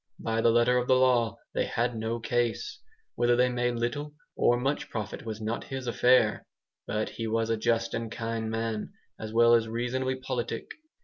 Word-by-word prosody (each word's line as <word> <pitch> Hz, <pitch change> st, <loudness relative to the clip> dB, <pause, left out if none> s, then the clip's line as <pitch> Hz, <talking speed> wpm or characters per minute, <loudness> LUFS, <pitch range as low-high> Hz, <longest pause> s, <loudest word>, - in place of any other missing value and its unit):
By 115 Hz, 0 st, -1 dB
the 115 Hz, -, +4 dB
letter 120 Hz, +2 st, +4 dB
of 125 Hz, -, -3 dB
the 130 Hz, -, +5 dB
law, 125 Hz, -3 st, +3 dB, 0.2 s
they -, -, +1 dB
had 120 Hz, +1 st, -1 dB
no 115 Hz, +1 st, -2 dB
case. 120 Hz, 0 st, -1 dB, 0.3 s
Whether 120 Hz, 0 st, +3 dB
they 125 Hz, +1 st, +3 dB
made 125 Hz, 0 st, 0 dB
little 145 Hz, +6 st, -3 dB, 0.2 s
or 120 Hz, -, +3 dB
much 135 Hz, +3 st, -1 dB
profit 110 Hz, 0 st, -5 dB
was 110 Hz, -1 st, -4 dB
not 110 Hz, +1 st, -3 dB
his 135 Hz, -1 st, -5 dB
affair. 120 Hz, -2 st, +3 dB, 0.4 s
But 105 Hz, +1 st, -1 dB
he 115 Hz, -, -5 dB
was 115 Hz, +1 st, 0 dB
a -, -, +3 dB
just 115 Hz, +1 st, 0 dB
and 115 Hz, -1 st, -3 dB
kindly 115 Hz, -1 st, -3 dB
man, 115 Hz, -1 st, -3 dB, 0.3 s
as 110 Hz, 0 st, -6 dB
well 115 Hz, +1 st, +5 dB
as 115 Hz, -1 st, +4 dB
reasonably 125 Hz, +3 st, -1 dB
politic. 130 Hz, -2 st, -4 dB
115 Hz, 185 wpm, -28 LUFS, 115-125 Hz, 0.4 s, the